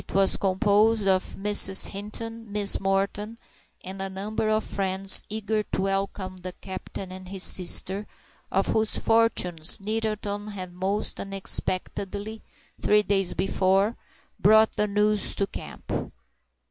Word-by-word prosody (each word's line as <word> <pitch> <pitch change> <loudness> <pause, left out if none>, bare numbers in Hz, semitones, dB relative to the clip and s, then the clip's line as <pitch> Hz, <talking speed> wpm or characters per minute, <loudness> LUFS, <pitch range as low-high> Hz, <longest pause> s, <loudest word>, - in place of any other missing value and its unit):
It - - -8
was 195 0 +3
composed 205 +2 +2
of 185 -1 +1
Mrs. 195 -1 +4
Hinton, 225 +2 -6
Miss 205 -1 +2
Morton 195 +3 -1 0.5
and 190 +1 -7
a 195 - -3
number 210 +3 -3
of 215 0 +1
friends 190 -1 +3
eager 215 0 -1
to 205 - -3
welcome 195 -1 -3
the 180 0 -7
captain 190 0 -8
and 185 0 -10
his 190 -1 0
sister, 190 +2 +2 0.4
of 195 +1 +1
whose 220 -1 +2
fortunes 185 -8 +2
Nettleton 210 -1 -3
had 185 -4 -7
most 190 +3 -2
unexpectedly, 195 +2 -2 0.4
three 210 0 +3
days 195 -3 +1
before, 195 +3 +1 0.4
brought 220 +2 +5
the 210 - +1
news 210 0 0
to 200 - 0
camp. - - -9
200 Hz, 130 wpm, -25 LUFS, 190-210 Hz, 0.5 s, brought